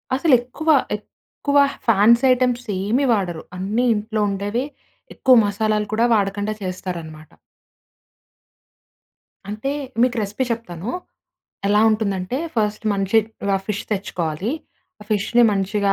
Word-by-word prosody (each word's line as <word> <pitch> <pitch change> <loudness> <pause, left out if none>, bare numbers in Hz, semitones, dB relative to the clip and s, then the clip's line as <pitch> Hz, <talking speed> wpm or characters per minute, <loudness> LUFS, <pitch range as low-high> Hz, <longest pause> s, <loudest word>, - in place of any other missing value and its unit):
అసలు 280 +2 +2
ఎక్కువ, 285 +6 -5 0.3
ఎక్కువ 285 +6 -4 0.3
ఫ్యాన్సీ 230 +3 +5
ఐటెమ్స్ 250 -1 0 0.2
ఏమీ 235 +8 +1
వాడరు. 175 -6 -2
అన్నీ 210 +7 0
ఇంట్లో 215 +1 -2
ఉండేవి, 205 +6 -2 0.5
ఎక్కువ 255 -1 +5
మసాలాలు 210 +1 0
కూడా 230 +2 +3
వాడకుండా 205 +1 -1
చేస్తారన్నమాట. 170 -4 -6 2.2
అంటే 215 +6 -3 0.3
మీకు 250 0 +3
రెసిపీ 210 +5 -2
చెప్తాను. 210 -4 -5 0.8
ఎలా 210 +1 +4
ఉంటుందంటే, 205 +1 -1 0.2
ఫస్ట్ 215 0 -1
మంచి 195 +2 +2 0.3
రా 195 - +3
ఫిష్ 205 -1 -3
తెచ్చుకోవాలి. 185 -1 -2 0.5
ఆ - - -11
ఫిష్‌ని 215 +4 +2
మంచిగా 200 +1 +1
210 Hz, 110 wpm, -21 LUFS, 195-235 Hz, 2.2 s, ఫ్యాన్సీ